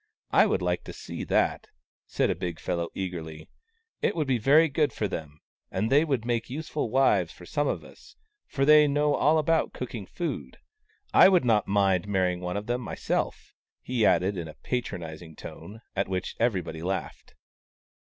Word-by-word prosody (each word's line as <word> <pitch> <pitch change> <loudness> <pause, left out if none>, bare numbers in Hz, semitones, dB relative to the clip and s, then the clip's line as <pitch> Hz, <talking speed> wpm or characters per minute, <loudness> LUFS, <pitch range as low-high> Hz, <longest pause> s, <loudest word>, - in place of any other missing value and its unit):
I - - +5
would 90 - 0
like 90 0 0
to - - -7
see - - -7
that! - - +1 0.2
" - - -84
said - - +1
a - - -1
big 85 -3 -5
fellow, 85 -1 -2
eagerly. 80 -4 -5 0.3
" 455 0 -49
It - - +1
would 155 -3 0
be 130 -3 +1
very 150 +8 +5
good 150 0 +1
for 105 - -2
them, 75 -4 -7 0.3
and 110 - -1
they 145 +3 +6
would 135 -8 -1
make 120 -1 -1
useful 150 -2 -3
wives 105 -9 +3
for 90 - -13
some 145 +9 -1
of - - -2
us, - - -16 0.3
for 135 -1 0
they 150 0 +7
know 145 +1 +2
all 155 +2 +3
about 160 +1 +1
cooking 115 -6 -6
food. 135 - -5 0.6
I - - +8
would 180 -7 +3
not 110 -4 +3
mind 95 -2 +2
marrying 95 -3 +1
one 90 +1 -3
of 105 - -4
them 120 +2 -1
myself! 115 - -3
" - - -67
he 125 -3 -1
added, 100 -1 +3
in 85 -2 -4
a 75 - -10
patronizing 85 -9 -4
tone, 110 +8 -10
at 100 0 0
which 95 -1 -3
everybody 90 -9 -1
laughed. 95 +3 -4
105 Hz, 190 wpm, -27 LUFS, 90-140 Hz, 0.6 s, I